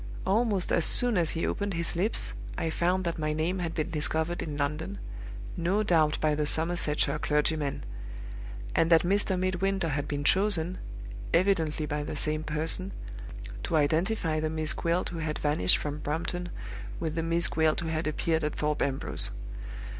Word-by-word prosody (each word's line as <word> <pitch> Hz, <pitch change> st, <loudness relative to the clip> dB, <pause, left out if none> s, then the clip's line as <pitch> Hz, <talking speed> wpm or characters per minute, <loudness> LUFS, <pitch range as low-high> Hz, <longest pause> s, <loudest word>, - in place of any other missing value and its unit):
Almost 205 Hz, -1 st, +2 dB
as 170 Hz, -, +3 dB
soon 245 Hz, +5 st, +5 dB
as 170 Hz, -4 st, +3 dB
he 165 Hz, -, -1 dB
opened 200 Hz, -2 st, -1 dB
his 170 Hz, 0 st, 0 dB
lips, 195 Hz, +6 st, +1 dB, 0.2 s
I 165 Hz, -, -1 dB
found 180 Hz, +3 st, +1 dB
that 170 Hz, -2 st, -2 dB
my 155 Hz, 0 st, 0 dB
name 165 Hz, +5 st, 0 dB
had 165 Hz, -2 st, -2 dB
been 160 Hz, +2 st, -1 dB
discovered 160 Hz, +2 st, 0 dB
in 150 Hz, -2 st, -4 dB
London 145 Hz, -7 st, -2 dB, 0.6 s
(no 185 Hz, +5 st, +1 dB
doubt 160 Hz, -6 st, +3 dB
by 155 Hz, -1 st, +2 dB
the 150 Hz, 0 st, 0 dB
Somersetshire 160 Hz, -2 st, +1 dB
clergyman); 150 Hz, -1 st, +1 dB, 0.9 s
and 165 Hz, -, +3 dB
that 165 Hz, -2 st, +6 dB
Mr. 195 Hz, +1 st, +2 dB
Midwinter 185 Hz, 0 st, 0 dB
had 145 Hz, -1 st, -1 dB
been 145 Hz, -1 st, -2 dB
chosen 185 Hz, 0 st, +3 dB, 0.6 s
(evidently 165 Hz, -4 st, +2 dB
by 150 Hz, 0 st, -2 dB
the 150 Hz, -, -4 dB
same 155 Hz, +1 st, 0 dB
person) 160 Hz, +5 st, -1 dB, 0.7 s
to 170 Hz, -, -1 dB
identify 160 Hz, +2 st, +2 dB
the 155 Hz, 0 st, 0 dB
Miss 155 Hz, 0 st, 0 dB
Gwilt 170 Hz, +2 st, 0 dB
who 170 Hz, -, -5 dB
had 155 Hz, -1 st, -2 dB
vanished 145 Hz, -12 st, +3 dB
from 150 Hz, 0 st, -4 dB
Brompton 170 Hz, +4 st, -2 dB, 0.5 s
with 160 Hz, -2 st, -2 dB
the 165 Hz, -, -1 dB
Miss 165 Hz, +1 st, +3 dB
Gwilt 160 Hz, 0 st, +2 dB
who 165 Hz, -, -3 dB
had 160 Hz, 0 st, -1 dB
appeared 160 Hz, +1 st, 0 dB
at 150 Hz, -, -1 dB
Thorpe 150 Hz, 0 st, 0 dB
Ambrose. 135 Hz, -1 st, 0 dB
160 Hz, 170 wpm, -29 LUFS, 150-175 Hz, 0.9 s, that